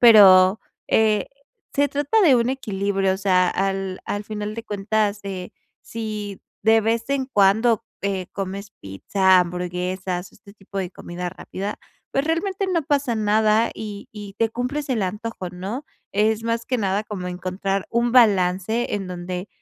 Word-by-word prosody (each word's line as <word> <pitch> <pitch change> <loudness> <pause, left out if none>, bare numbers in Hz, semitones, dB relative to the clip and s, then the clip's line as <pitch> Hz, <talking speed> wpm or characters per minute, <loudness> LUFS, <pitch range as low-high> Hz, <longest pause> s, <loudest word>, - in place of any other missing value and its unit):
pero, 200 -4 +8 0.3
eh, 215 -2 +3 0.5
se 285 +1 +3
trata 290 +10 +1
de 290 -9 +6
un 235 +1 +1
equilibrio, 195 -6 0
o - - -3
sea, 185 -2 +3
al 195 0 -1
al 205 - -3
final 210 0 -4
de 230 - -5
cuentas 210 0 0
de 190 -2 -6 0.3
Si 210 -3 -5 0.2
de 225 0 +5
vez 230 +3 -1
en 275 -2 0
cuando, 220 0 +3 0.2
eh, 195 -2 -1
comes 195 +1 -5
pizza, 185 - +3
hamburguesas, 180 +1 -3
o - - -23
este 200 - -16
tipo 200 -1 -8
de 185 -2 -2
comida 175 +1 -6
rápida, 195 +3 -6 0.3
pues, 275 - +1
realmente 380 +5 -1
no 335 -2 +1
pasa 280 -5 +1
nada 215 +1 +3
y 210 -2 -7
y 205 -2 -9
te 225 -1 +2
cumples 255 +5 -3
el 240 -5 0
antojo, 210 0 -4
¿no? 195 +10 -5 0.3
Es 215 +2 +1
más 230 0 -1
que 255 +1 -1
nada 200 -1 0
como 205 -4 -6
encontrar 185 +2 -2
un 235 +1 +1
balance 205 -1 +3
en 195 -2 -3
donde 180 +1 -5
205 Hz, 160 wpm, -23 LUFS, 190-230 Hz, 0.5 s, pero